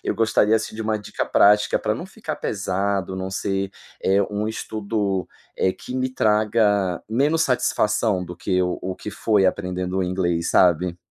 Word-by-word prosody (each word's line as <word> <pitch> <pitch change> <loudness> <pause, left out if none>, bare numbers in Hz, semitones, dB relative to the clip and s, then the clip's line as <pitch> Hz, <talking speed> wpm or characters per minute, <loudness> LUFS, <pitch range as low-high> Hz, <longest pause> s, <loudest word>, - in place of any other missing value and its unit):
eu - - 0
gostaria 110 -1 +3
assim 110 0 -4
de 110 - -4
uma 110 0 0
dica 105 - -4
prática 105 +1 +4
pra - - -1
não - - -6
ficar - - -6
pesado, 100 -1 -2
não 95 0 -4
ser, 95 0 -2 0.3
eh, 95 +1 +3
um 105 +1 -2
estudo, 105 -3 -2 0.3
eh, 95 - +2
que 125 - -9
me 130 0 0
traga 105 -5 +2
menos 145 +8 +2
satisfação 105 - +1
do 90 0 -9
que 90 +1 0
o 90 0 -1
o 95 0 -4
que 105 - -7
foi 100 -1 +2
aprendendo 90 -1 -2
o 95 - +1
inglês, 85 -2 -1
sabe? 90 0 +3
100 Hz, 175 wpm, -22 LUFS, 95-110 Hz, 0.3 s, prática